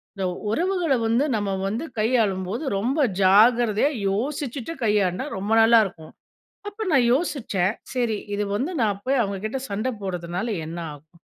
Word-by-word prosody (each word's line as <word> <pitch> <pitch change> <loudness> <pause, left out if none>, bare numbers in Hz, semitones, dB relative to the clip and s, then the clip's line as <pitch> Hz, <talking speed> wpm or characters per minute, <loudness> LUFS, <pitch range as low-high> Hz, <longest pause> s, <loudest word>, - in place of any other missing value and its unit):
இந்த 195 -1 -2 0.2
உறவுகள 345 - +1
வந்து 230 +5 +2
நம்ம 205 -2 -1 0.2
வந்து 230 +10 -3
கையாளும் 215 -5 +1
போது, 225 +10 -3
ரொம்ப 250 +10 -1 0.2
ஜாக்கிரதையா 220 +5 +5 0.2
யோசிச்சிட்டு 270 +5 -3
கையாண்டா 210 0 +1
ரொம்ப 200 +3 -4
நல்லா 230 +1 +7
இருக்கும். 160 -5 -10 0.6
அப்ப 430 +2 -5
நான் 260 -5 +4
யோசிச்சேன், 230 - 0 0.2
"சரி 235 -4 0 0.2
இது 205 +1 -1
வந்து 275 - -2
நான் 205 -3 0
போய் 270 0 +2
அவங்ககிட்ட 210 +4 -3
சண்ட 210 +5 -2
போடுறதுனால 180 +2 -3 0.2
என்ன 165 +2 -6 0.2
ஆகும்?" 155 +4 -19
220 Hz, 145 wpm, -24 LUFS, 195-255 Hz, 0.6 s, நல்லா